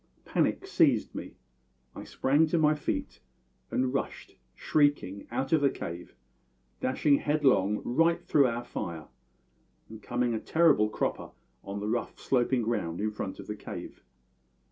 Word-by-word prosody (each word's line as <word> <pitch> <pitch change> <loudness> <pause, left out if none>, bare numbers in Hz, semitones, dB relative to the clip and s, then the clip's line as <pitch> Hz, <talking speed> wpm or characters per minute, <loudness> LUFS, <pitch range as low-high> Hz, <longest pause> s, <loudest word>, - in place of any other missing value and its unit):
Panic - - 0
seized - - +2
me; - - -7 0.6
I - - -8
sprang 145 +4 +2
to 170 - +1
my 155 -1 +4
feet 150 - -3 0.5
and 130 0 0
rushed, 135 - -4 0.2
shrieking, 145 -10 +1
out 135 - -2
of 155 - +4
the 140 - +4
cave, 85 - -7 0.6
dashing 140 +2 +2
headlong 130 -11 +2
right 165 +7 +2
through 140 -3 +4
our 120 0 -3
fire, 85 -10 -6 0.8
and 110 0 -10
coming 120 +2 -1
a 110 - -1
terrible 155 -10 +3
cropper - - -2 0.3
on 100 +1 -5
the 105 - -3
rough, 120 +2 -2
sloping 125 -1 +1
ground 100 -8 -2
in 105 +1 -1
front 100 -2 -5
of - - -8
the 105 - -5
cave. - - -8
120 Hz, 145 wpm, -29 LUFS, 105-145 Hz, 0.8 s, my